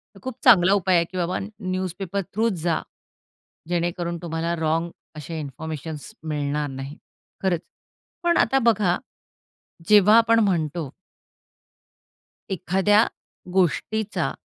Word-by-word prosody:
तर 195 - -14
खूप 260 -1 -5
चांगला 195 -6 +7
उपाय 190 -2 +2
आहे 170 - +4
की 185 - -6
बाबा 180 0 -1
अ, - - -3 0.2
न्यूजपेपर 185 0 -3
थ्रूच 225 +1 +1
जा. 170 -2 +1 0.9
जेणेकरून 175 0 -1
तुम्हाला 165 0 -2
रॉन्ग 165 +1 0 0.3
असे 155 +2 -6
इन्फॉर्मेशनस 155 +1 -6 0.2
मिळणार 150 0 -1
नाहीत, 135 +2 -7 0.5
खरंच. 180 -4 +1 0.6
पण 345 0 +2
आता 270 - +3
बघा, 210 -6 +3 0.9
जेव्हा 210 +1 +7
आपण 230 0 +4
म्हणतो 165 -7 0 1.6
एखाद्या 195 +4 +3 0.5
गोष्टीचा 195 +4 0
175 Hz, 110 wpm, -24 LUFS, 160-200 Hz, 1.6 s, चांगला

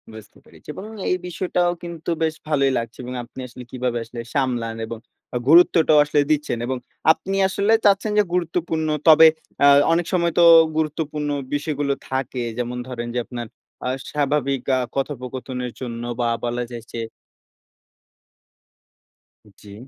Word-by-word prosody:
বুঝতে 110 - -13
পেরেছি। - - -19
এবং - - -8 0.3
এই 180 - +3
বিষয়টাও 180 0 0
কিন্তু 170 -1 -6
বেশ 160 0 0
ভালোই 140 -3 +2
লাগছে 115 +1 -5
এবং 125 - -6
আপনি 125 +2 -13
আসলে 125 +1 -11
কিভাবে 125 -1 -2
আসলে 115 +1 -8
সামলান 120 -4 -1
এবং 115 - -6 0.4
আ - - +2
গুরুত্বটাও 160 -2 +6
আসলে 145 0 +2
দিচ্ছেন 150 -5 0
এবং 130 +1 -2 0.3
আপনি 195 +4 -2
আসলে 200 +3 +1
চাচ্ছেন 200 +1 +3
যে, 210 - +6
গুরুত্বপূর্ণ 165 -2 -1 0.2
তবে 160 +1 +9 0.3
অ্যা 140 - +6 0.3
অনেক 175 +1 +1
সময় 170 -2 +2
তো 170 - +6 0.3
গুরুত্বপূর্ণ 150 -1 -2 0.2
বিষয়গুলো 145 -1 -1 0.2
থাকে। 130 -2 -2
যেমন 125 0 -3
ধরেন, 120 -2 -5
যে, - - +1
আপনার 120 -2 -6 0.4
আ - - 0 0.2
স্বাভাবিক 140 -2 0 0.2
আ - - +1 0.2
কথোপকথনের 130 -2 -4
জন্য 120 -2 -5 0.2
বা 120 -1 +1 0.2
বলা 120 +1 -2
যায় 115 -1 -7
যে 115 - -4 2.6
জ্বী। 100 -1 -12
140 Hz, 145 wpm, -22 LUFS, 125-160 Hz, 2.6 s, তবে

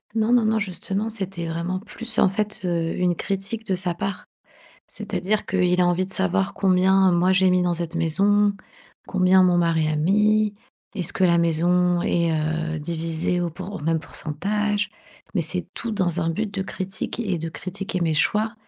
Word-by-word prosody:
Non, 220 +1 +1
non, 240 -2 +5
non, 220 0 +2
justement, 200 +2 -3
c'était 190 -6 -4
vraiment 170 +3 -2
plus 220 +2 -4
en - - +5
fait, 210 +1 -3
heu, 170 -2 0
une 180 -1 +1
critique 200 +5 -3
de 190 - 0
sa 180 -1 -1
part. 195 +2 -4 0.6
C'est-à-dire 195 +3 -2
qu'il 180 -1 +2
a 180 - +4
envie 175 +1 +1
de 190 - -8
savoir 95 - 0
combien 190 0 +4
moi 175 +2 +3
j'ai 190 0 +4
mis 180 0 +3
dans 175 -1 +1
cette 170 0 -4
maison? 200 +5 +3 0.5
Combien 185 0 +4
mon 180 -1 +4
mari 165 -2 +2
a 155 - 0
mis? 210 +6 +3 0.4
Est-ce 180 -6 -3
que 190 - +2
la 170 -1 +4
maison 175 +2 +2
est, 170 -1 +1
heu, 160 +1 -1
divisée 165 +2 -2
au 175 - 0
pour 185 +4 -8
au - - -4
même 160 +1 0
pourcentage? 205 +8 -2 0.4
Mais 185 - +2
c'est 175 +3 -2
tout 235 -1 -4
dans 180 -4 0
un 165 - 0
but 205 +5 -3
de 195 -1 -2
critique 190 +4 -4
et 195 -7 -1
de 165 +1 -4
critiquer 185 +2 -5
mes 165 -2 +1
choix 215 +8 +1
180 Hz, 185 wpm, -23 LUFS, 170-200 Hz, 0.6 s, non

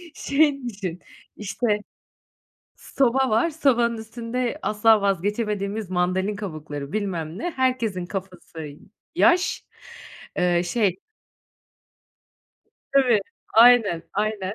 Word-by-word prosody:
Şey 280 -1 +1
düşün, 190 -5 -6 0.4
işte 215 +4 -3 1.1
soba 265 0 +1
var, 225 +10 +2
sobanın 240 -7 +2
üstünde 235 +4 -4
asla 215 +1 +4
vazgeçemediğimiz 200 +1 -1
mandalina 185 +3 0
kabukları 155 -7 -6
bilmem 180 -5 -3
ne, 350 - -3
herkesin 240 - -1
kafası 180 -4 -7
y 145 -1 -9 0.4
yaş, 350 +1 +3 0.7
eee, 175 -1 +2
şey 190 0 0 1.9
Tabii, 255 -6 +4 0.3
aynen, 225 -7 +6
aynen, 205 -1 -2
210 Hz, 90 wpm, -23 LUFS, 185-245 Hz, 1.9 s, aynen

